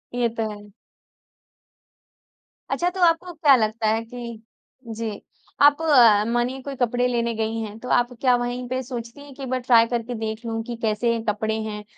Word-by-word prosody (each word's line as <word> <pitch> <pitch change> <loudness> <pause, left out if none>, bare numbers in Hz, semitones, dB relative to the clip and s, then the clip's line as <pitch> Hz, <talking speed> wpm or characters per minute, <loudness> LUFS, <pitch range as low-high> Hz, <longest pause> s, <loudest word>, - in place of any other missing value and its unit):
ये 240 -1 +1
तो 220 -1 -1
है। 205 0 -12 2.0
अच्छा 350 +1 0
तो 375 +1 -6
आपको 340 +2 +1
क्या 300 -4 +5
लगता 220 -1 0
है 220 +1 +1
कि 235 -1 -8 0.5
जी। 225 -2 -5 0.4
आप 290 +2 +6
अ, 240 -10 +6
मानिए 240 +3 -1
कोई 275 +1 -6
कपड़े 245 -1 +1
लेने 235 -1 0
गयी 225 +1 -2
हैं, 215 -1 -6
तो 250 - -8
आप 245 0 +2
क्या 255 -2 +4
वही 245 +1 -2
पे 255 +1 -2
सोचती 240 +1 -7
है 285 - -13
कि 275 - -9
एक 260 - -5
बार 255 0 0
ट्राई 235 -2 +5
करके 240 0 -3
देख 220 +1 -4
लूँ 225 -1 -2
की 240 - -4
कैसे 230 +1 +1
कपड़े 220 +1 -1
हैं, 210 -1 -6
235 Hz, 185 wpm, -23 LUFS, 220-255 Hz, 2.0 s, आप